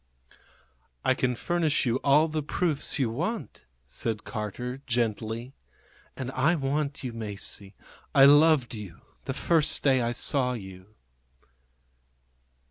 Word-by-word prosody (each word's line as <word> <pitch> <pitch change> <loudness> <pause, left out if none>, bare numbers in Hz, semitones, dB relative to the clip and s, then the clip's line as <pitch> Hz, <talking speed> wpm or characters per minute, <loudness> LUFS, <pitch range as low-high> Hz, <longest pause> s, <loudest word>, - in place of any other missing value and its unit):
"I - - +4
can 125 -1 0
furnish 160 +1 0
you 120 0 +1
all 145 +4 +4
the 155 -1 -2
proofs 150 0 -1
you 130 -6 0
want," 180 - -4 0.2
said 105 - -3
Carter, 125 +5 -5
gently. 115 +1 -2 0.6
"And 130 0 -4
I 140 +6 +2
want 140 0 -2
you, 125 -2 -4
Masie. 105 -2 -3 0.4
I 135 - +8
loved 145 -3 +5
you 105 -6 -9 0.2
the - - -3
first 165 -3 +2
day 135 -3 +4
I 120 0 0
saw 125 +1 +1
you." 95 -2 -10
130 Hz, 125 wpm, -27 LUFS, 115-145 Hz, 0.6 s, I